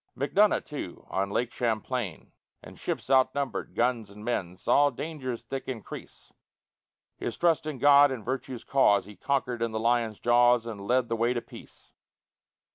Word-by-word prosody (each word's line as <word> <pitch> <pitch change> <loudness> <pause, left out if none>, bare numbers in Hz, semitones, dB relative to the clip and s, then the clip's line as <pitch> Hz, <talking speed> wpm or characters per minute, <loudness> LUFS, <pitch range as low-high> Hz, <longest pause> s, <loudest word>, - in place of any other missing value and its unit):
Macdonough, 190 +10 +3
too, 140 - -7
on 95 +1 0
Lake 120 +4 -1
Champlain, 115 -4 -3 0.3
In - - -11
ships - - -4
outnumbered, 130 -1 +1
guns, 120 -3 0
and 105 +1 -12
men, 95 -7 -2
Saw 145 +9 +3
dangers 140 -7 -5
thick 135 0 -6
increase; 120 -6 -8 0.8
His - - -4
trust 165 -3 +2
in 150 -3 -4
God 145 +2 +7
and 125 -5 -5
virtue's 130 -1 -4
cause 105 -7 +3
He 105 +1 -12
conquer'd 125 +1 -1
in 115 -1 -1
the 110 - -1
lion's 115 -2 +1
jaws, 120 0 +4
And 100 -4 -7
led 125 0 +2
the 115 - -1
way 120 +2 +1
to 120 - -1
peace. - - -14
120 Hz, 160 wpm, -28 LUFS, 110-135 Hz, 0.8 s, God